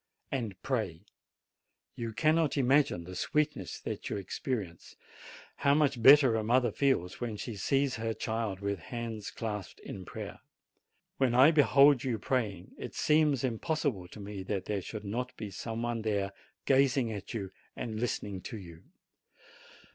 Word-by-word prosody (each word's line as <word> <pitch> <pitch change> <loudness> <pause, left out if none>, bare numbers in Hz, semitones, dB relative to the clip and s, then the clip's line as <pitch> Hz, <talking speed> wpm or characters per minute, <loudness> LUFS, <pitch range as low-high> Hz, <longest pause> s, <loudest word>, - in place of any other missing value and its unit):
And 115 -8 -3
pray. 105 -9 -2 0.9
You 115 -1 -4
cannot 155 +4 +2
imagine 135 -8 +3
the 90 +2 -9
sweetness 150 - -1
that - - -5
you - - -2
experience, 100 -2 -4 0.6
how 140 0 +3
much 140 -5 +2
better 135 -1 +8
a 110 -1 0
mother 120 +1 +3
feels 125 -9 0
when 115 -3 -3
she 115 +1 -5
sees 135 +5 +1
her 115 0 -2
child 110 -4 -2
with 100 -1 -2
hands 115 +2 -5
clasped 105 -4 -5
in 95 - -7
prayer. - - -7 0.8
When 130 -3 +2
I 135 +5 +8
behold 140 -3 +6
you 125 -4 0
praying, 105 -8 -2
it - - -7
seems 150 -4 +3
impossible 130 - -1
to 100 - -12
me 100 -1 -6
that 95 0 -3
there 105 -2 -1
should 105 +3 -7
not 125 +5 -3
be 105 -3 -6
some 115 +3 -4
one 120 -1 -1
there 100 -3 0 0.3
gazing 135 -3 +3
at 105 +3 -7
you 95 -4 -4 0.2
and 110 -2 -4
listening 105 -5 -2
to 110 - -6
you. 85 -4 -11
115 Hz, 155 wpm, -31 LUFS, 100-135 Hz, 0.9 s, better